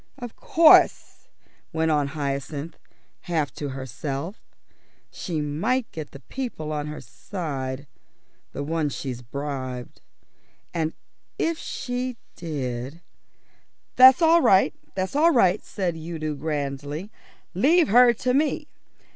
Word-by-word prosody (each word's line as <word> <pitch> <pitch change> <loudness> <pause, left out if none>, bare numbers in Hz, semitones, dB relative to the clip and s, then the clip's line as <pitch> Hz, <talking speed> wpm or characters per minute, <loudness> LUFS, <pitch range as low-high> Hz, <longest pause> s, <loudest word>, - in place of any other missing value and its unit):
"Of 245 -4 -8
course," 325 -1 +4 0.4
went 160 0 +1
on 145 -2 +2
Hyacinth, 140 +2 -3 0.5
half 155 -6 0
to 145 - -5
herself, 135 - -5 0.7
"she 165 -5 -3
might 215 - -1
get 155 -2 -6
the 140 - -12
people 195 - -5
on 150 0 -3
her 150 0 -6
side, 140 -7 -5 0.7
the 140 - -4
ones 155 -1 -1
that - - -5
she's 125 -3 -5
bribed. 130 -1 -6 0.7
And 160 -2 -1 0.4
if 330 -1 0
she 250 0 -4 0.2
did 140 -2 -5 0.5
" - - -41
"That's 260 +5 +8
all 330 +1 +6
right, 190 -8 +5 0.2
that's 190 +5 -2
all 315 +3 +5
right," 210 - +3
said 180 -4 -2
Udo 160 -1 -4
grandly. 145 +4 -4 0.4
"Leave 310 - +4
her 245 +3 +7
to 250 +2 -1
me. 295 +3 +1
160 Hz, 120 wpm, -25 LUFS, 140-230 Hz, 0.7 s, That's